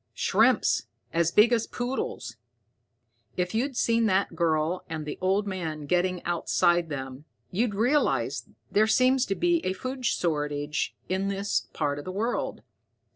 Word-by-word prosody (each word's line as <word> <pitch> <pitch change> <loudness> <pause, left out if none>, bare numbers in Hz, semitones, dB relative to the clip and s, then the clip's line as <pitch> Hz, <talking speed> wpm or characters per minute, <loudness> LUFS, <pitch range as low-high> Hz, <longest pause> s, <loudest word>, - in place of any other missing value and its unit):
"Shrimps - - +3 0.3
as 165 0 +2
big 220 +6 +5
as 230 -2 +1
poodles. 245 - -4 1.0
If 180 +1 -1
you'd 250 +3 -1
seen 230 -1 +2
that 195 0 +1
girl 165 +1 0
and 160 -1 -4
the 150 - -6
old 195 +3 +2
man 165 -6 -4
getting 180 +2 0
outside 175 0 +1
them, 135 0 -6 0.3
you'd 210 +2 0
realize 250 +8 +1
that - - -25 0.2
there 215 +2 +4
seems 255 +3 +3
to 195 - 0
be 345 - +1
a 185 - 0
food 255 +5 -6
shortage 150 -3 -1
in 190 +1 -1
this 200 +1 -1
part 145 -2 -1
of - - -9
the 185 - -4
world. 220 +6 -2
185 Hz, 150 wpm, -27 LUFS, 160-225 Hz, 1.0 s, big